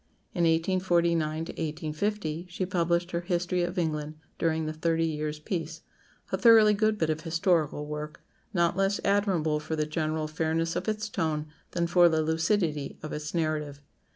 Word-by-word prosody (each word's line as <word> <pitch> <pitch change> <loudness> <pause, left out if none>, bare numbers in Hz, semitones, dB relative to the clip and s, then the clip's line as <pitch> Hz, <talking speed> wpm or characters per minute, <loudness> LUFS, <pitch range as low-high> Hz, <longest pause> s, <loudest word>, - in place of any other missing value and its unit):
In 170 -2 +1
1849 170 -1 +2 0.2
1850 160 +2 -3
she 180 +1 -2
published 175 -1 0
her 170 - -1
"History 175 0 0
of 175 +2 -2
England 155 -3 -1 0.2
during 160 -1 +1
the 155 - -3
Thirty 165 +1 +1
Years' 155 -1 -2
Peace," 165 0 -4 0.5
a - - 0
thoroughly 225 -3 +7
good 215 +1 +2
bit 160 -5 +1
of 155 0 -3
historical 165 -3 +1
work, 150 0 -6 0.3
not 170 -4 +2
less 195 +1 +1
admirable 190 -7 +2
for 155 +1 -4
the 155 -1 0
general 155 0 -2
fairness 160 +1 -1
of 180 +4 -3
its 215 0 -2
tone 160 -7 -1 0.3
than 170 -1 +1
for 175 0 +5
the 160 -1 +1
lucidity 160 -2 0
of 155 - -5
its 150 +2 -5
narrative. 155 -3 -1
165 Hz, 160 wpm, -28 LUFS, 155-180 Hz, 0.5 s, thoroughly